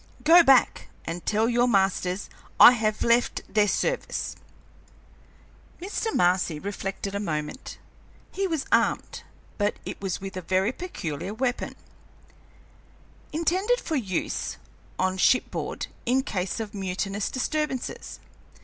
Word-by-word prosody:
Go 335 +3 +8
back 270 -6 +4 0.2
and 170 +1 -5
tell 215 +2 +2
your 240 +1 +3
masters 195 -3 +1 0.3
I - - +11
have 215 -3 0
left 235 +1 +2
their 210 -1 +2
service." - - -1 1.4
Mr. 410 +5 -3
Marcy 180 -3 +2
reflected 195 +2 -5
a 200 - -2
moment. 155 - -4 0.5
He 390 0 -1
was 320 -6 -2
armed, - - +1 0.4
but 205 +1 +1
it - - -6
was 190 -3 -2
with 195 -1 -7
a 185 - -4
very 185 +5 +1
peculiar 200 - -5
weapon, 250 +1 -2 1.6
intended 375 +9 +1
for 320 - -3
use 195 - -2 0.4
on 185 0 0
shipboard 255 - +1 0.2
in 260 +2 +3
case 185 -5 -3
of 220 -2 -5
mutinous 195 +1 -2
disturbances. 285 0 -3
210 Hz, 120 wpm, -26 LUFS, 190-265 Hz, 1.6 s, I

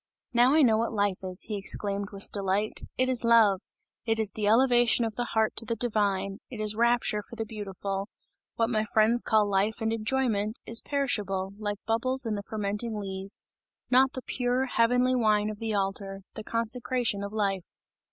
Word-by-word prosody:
"Now 245 +4 +5
I 315 - +6
know 225 -4 +4
what 230 0 -1
life 205 -3 0
is," 185 0 -1
he 210 - -3
exclaimed 200 0 -2
with 200 -1 -8
delight, 200 +1 -1 0.2
"it 255 - +2
is 255 -2 +1
love! 225 -5 +5 0.4
it 225 -1 0
is 215 -3 +3
the 210 -1 -2
elevation 240 0 +4
of 220 -2 -4
the 245 - -2
heart 220 -1 +1
to 230 - -3
the 230 - -2
divine, 200 -4 -1
it 240 - -8
is 215 -1 0
rapture 235 -2 +2
for 235 - -12
the 225 -1 -3
beautiful! 200 -2 -5 0.5
What 230 +1 +1
my 215 -2 +1
friends 220 +2 +3
call 215 -1 +2
life 200 +2 0
and 225 -1 0
enjoyment, 225 -1 0
is 230 0 +1
perishable, 200 -9 -2
like 205 -1 -3
bubbles 255 +4 +1
in 225 - -1
the 205 - -3
fermenting 210 +2 -3
lees, 195 -1 -3 0.5
not 260 +1 +5
the 260 - -6
pure, 250 +1 0
heavenly 250 +1 +2
wine 215 -3 +2
of 210 - -9
the 225 -2 -2
altar, 195 0 -2
the 215 - -7
consecration 230 -1 0
of 200 - -5
life!" 195 -4 -1
215 Hz, 185 wpm, -28 LUFS, 200-235 Hz, 0.5 s, I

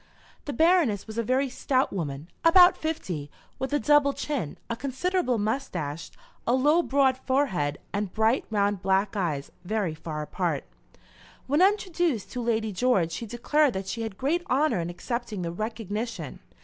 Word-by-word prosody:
The 290 - -3
Baroness, 320 - +3
was 220 +1 -5
a - - +1
very 260 +4 +1
stout 260 +1 0
woman, 150 -5 -4 0.2
about 355 +2 +7
fifty, 180 - -4 0.3
with 265 +1 -3
a 290 - +3
double 295 -1 +4
chin, 275 - -3
a 235 - -2
considerable 275 +2 0
moustache, 190 - -3 0.4
a 240 - +4
low 295 +6 +4
broad 270 -4 +2
forehead, 190 - 0 0.2
and 205 -2 -2
bright, 220 +4 +2
round, 205 -2 +1
black 195 +1 +1
eyes, 155 -8 -2
very 200 -3 -1
far 155 -1 -5
apart. - - -2 0.8
When 290 +5 +2
introduced 350 - +1
to 250 - -3
Lady 220 -2 0
George, 190 -5 +2
she 230 +7 -5
declared 255 +5 +2
that 190 0 -3
she 230 +4 -4
had 220 -4 -5
great 300 +8 +1
honour 285 - +2
in 170 0 -2
accepting 220 +1 -4
the 170 - -2
re 215 +6 -2
cog 225 -4 -10
nition. 210 - -4
230 Hz, 165 wpm, -27 LUFS, 190-280 Hz, 0.8 s, about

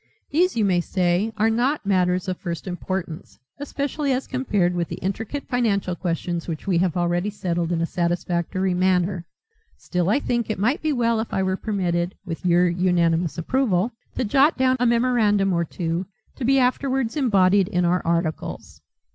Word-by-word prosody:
These, 355 +5 +2
you 215 - +3
may 180 -3 +2
say, 180 +4 0
are 220 +1 +3
not 250 +4 0
matters 185 -1 +1
of 185 -1 -2
first 170 -3 -5
importance, 180 -2 -5 0.2
especially 285 0 -2
as 260 +1 0
compared 210 -9 0
with 175 -1 -1
the - - -5
intricate 225 +9 -4
financial 205 -7 0
questions 170 -1 -3
which 160 -3 -5
we 185 -4 +2
have 180 -1 0
already 175 +3 0
settled 175 -4 -2
in 165 -1 0
a - - +2
satisfactory 175 +2 -1
manner. 180 -1 +1 0.5
Still 180 0 -1
I 225 - +3
think 240 -5 -1
it 215 - -1
might 230 +9 +1
be 310 - 0
well 235 -4 +1
if 220 - -4
I 190 - 0
were 190 0 0
permitted 180 -4 -1
with 170 -1 -6
your 175 +1 +4
unanimous 170 -2 +1
approval 215 +1 +1 0.2
to - - 0
jot 275 +8 +3
down 260 0 +3
a 245 - +3
memorandum 230 -5 +2
or 170 0 +1
two 170 +2 -3 0.3
to 270 - -6
be 270 +2 +4
afterwards 260 -1 +1
embodied 200 - +3
in 180 -3 0
our 180 +1 +2
articles." 170 -1 -3
190 Hz, 175 wpm, -23 LUFS, 175-235 Hz, 0.5 s, your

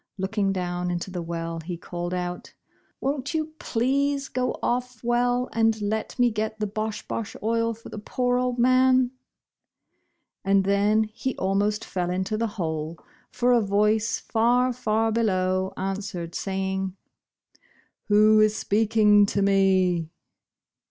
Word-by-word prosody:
Looking 195 +1 0
down 180 -1 -2
into 175 +2 -3
the 180 -1 -4
well 165 0 -4
he 170 +2 -6
called 175 +1 -5
out, 180 -1 -4 0.5
••Won't 280 +2 -2
you 310 0 -2
please 275 +4 0
go 255 0 -1
otF, 250 -1 -2
Well, 245 +1 +1
and 225 -1 +2
let 215 +1 -3
me 245 -1 +3
get 220 0 -3
the 210 - 0
Bosh 215 +1 -4
Bosh 225 - -4
Oil 230 +1 0
for 230 - -12
the 210 - -7
poor 245 +3 0
old 250 -1 -1
man? 255 0 +4 0.6
"' - - -51
And 195 0 +3
then, 200 +2 +3
he 220 +4 -4
almost 200 +2 0
fell 180 -2 -2
into 185 +3 -1
the 230 +1 0
hole, 160 -2 -3 0.3
for 250 0 +2
a 240 - +4
voice 210 +2 +1
far, 245 +3 +2
far 225 -2 0
below 190 -4 +1
answered, 190 -3 -4
saving, 190 -1 -2 1.1
"Who 215 +1 +5
is 215 0 +3
speaking 210 -1 +4
to 200 0 0
me?" 190 -4 +2
210 Hz, 140 wpm, -25 LUFS, 190-235 Hz, 1.1 s, Who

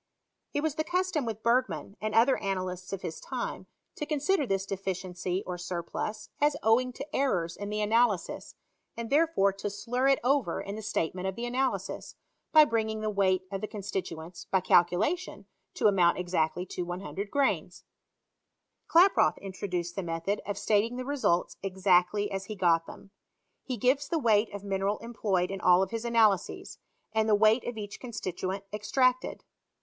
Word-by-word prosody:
It 290 - +1
was 315 -1 0
the 310 - -1
custom 360 -5 0
with 220 -1 -5
Bergman, 230 - +1
and 215 0 -2
other 240 +4 +5
analysts 185 -2 -3
of 195 -2 -5
his - - -5
time, - - -5 0.3
to 300 - -3
consider 300 +1 +1
this 195 -1 0
deficiency 185 -1 -3
or 180 -1 -5
surplus 180 +4 -4
as 290 0 +3
owing 245 +3 +3
to 275 +4 -7
errors 180 -12 0
in 205 0 -6
the 210 0 -2
analysis, 215 -3 +1 0.4
and 230 +1 -5
there 315 +4 +5
fore 200 -11 +2
to 195 +1 -4
slur 230 +6 -1
it 275 - +5
over 270 -1 +1
in 200 - -5
the 220 - -6
statement 185 -3 -2
of 190 - -3
the 235 - -4
analysis, 255 +2 -2 0.4
by 310 -1 +8
bringing 220 -3 -1
the 215 0 -1
weight 190 -2 +2
of 195 -1 -3
the 215 - -3
constituents, 180 -5 -6
by 190 - +2
cal 180 -1 +6
culation, 220 - -2 0.3
to - - -2
amount 185 -5 +4
exactly 175 -1 -1
to 180 - -5
100 185 +3 -5
grains. 280 +3 0 1.0
Klaproth 360 +4 +5
introduced 180 -3 -4
the 195 - -2
method 165 +4 -2
of 205 -1 -3
stating 220 +4 +1
the 255 - -4
results 260 -11 0
exactly 190 +1 +2
as 195 -1 -3
he 215 - -6
got 170 -3 +2
them. 195 - -12 0.5
He 255 -3 -4
gives 265 +6 +2
the 335 - +1
weight 225 -6 +3
of 205 -1 -7
mineral 195 +1 -1
employed 205 -6 -1
in 195 -1 -5
all 180 +1 +5
his 230 +4 -5
analyses, 225 -5 +1 0.3
and 220 0 +2
the 210 - +6
weight 215 +3 +4
of 240 -2 -4
each 205 -1 -6
constituent 195 -5 -4
extracted. 255 +4 +1
205 Hz, 170 wpm, -29 LUFS, 185-245 Hz, 1.0 s, by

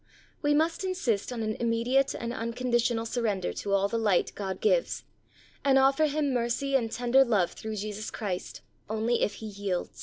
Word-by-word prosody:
We 290 -1 +3
must 330 +5 +1
insist 260 - -1
on 235 -2 -3
an 215 0 -1
immediate 235 +4 +1
and 235 0 -4
uncondi 240 +1 -1
tional 230 -1 0
surrender 220 -6 -1
to 200 - -3
all 200 0 +3
the 230 +2 -1
light 205 -5 +2
God 190 -2 -4
gives, - - +1 0.6
and 270 -1 +4
offer 275 +3 +4
him 290 -2 0
mercy 245 +3 -1
and 230 -4 +1
tender 245 +3 +4
love 210 -8 +2
through 220 0 -6
Jesus 210 +1 -4
Christ 190 -5 -4 0.3
only 220 +2 0
if 205 - +1
he 220 - -8
yields. 200 -3 -4
235 Hz, 180 wpm, -28 LUFS, 210-270 Hz, 0.6 s, and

